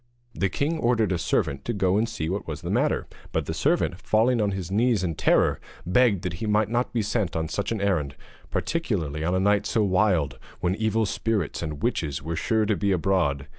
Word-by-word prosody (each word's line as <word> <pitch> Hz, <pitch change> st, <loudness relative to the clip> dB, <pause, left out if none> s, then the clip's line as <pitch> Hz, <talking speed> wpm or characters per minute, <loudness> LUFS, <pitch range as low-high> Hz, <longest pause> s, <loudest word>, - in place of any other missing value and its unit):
The 95 Hz, -, 0 dB
king 155 Hz, +3 st, -1 dB
ordered 115 Hz, -6 st, +2 dB
a 90 Hz, -, 0 dB
servant 70 Hz, -3 st, 0 dB
to 120 Hz, -, -1 dB
go 95 Hz, -3 st, +1 dB
and 115 Hz, +2 st, +1 dB
see 95 Hz, -9 st, -3 dB
what 95 Hz, +4 st, -3 dB
was -, -, -5 dB
the -, -, -4 dB
matter; -, -, +1 dB, 0.3 s
but -, -, -1 dB
the -, -, -3 dB
servant, 90 Hz, -, 0 dB
falling 115 Hz, +2 st, +2 dB
on 105 Hz, -, +2 dB
his 95 Hz, -2 st, -4 dB
knees 110 Hz, -1 st, +2 dB
in 85 Hz, -3 st, -1 dB
terror, -, -, +2 dB, 0.3 s
begged 100 Hz, 0 st, +3 dB
that 90 Hz, -, -2 dB
he 110 Hz, -, -1 dB
might 105 Hz, 0 st, +2 dB
not 120 Hz, +2 st, 0 dB
be 115 Hz, -3 st, 0 dB
sent 105 Hz, -4 st, -1 dB
on 80 Hz, 0 st, -1 dB
such 100 Hz, +7 st, -3 dB
an 115 Hz, -, -1 dB
errand, 85 Hz, -9 st, 0 dB, 0.3 s
particularly 85 Hz, -, -2 dB
on 90 Hz, +3 st, +1 dB
a -, -, +2 dB
night 100 Hz, +1 st, +2 dB
so 110 Hz, -, +1 dB
wild, 95 Hz, -, +1 dB, 0.2 s
when 90 Hz, +1 st, +1 dB
evil 110 Hz, +2 st, +1 dB
spirits 105 Hz, -4 st, -1 dB
and 75 Hz, -3 st, -5 dB
witches 80 Hz, -, -1 dB
were 80 Hz, +3 st, -4 dB
sure 110 Hz, +6 st, +1 dB
to 105 Hz, 0 st, +1 dB
be 100 Hz, 0 st, 0 dB
abroad. 85 Hz, -7 st, +1 dB
100 Hz, 215 wpm, -25 LUFS, 85-110 Hz, 0.3 s, begged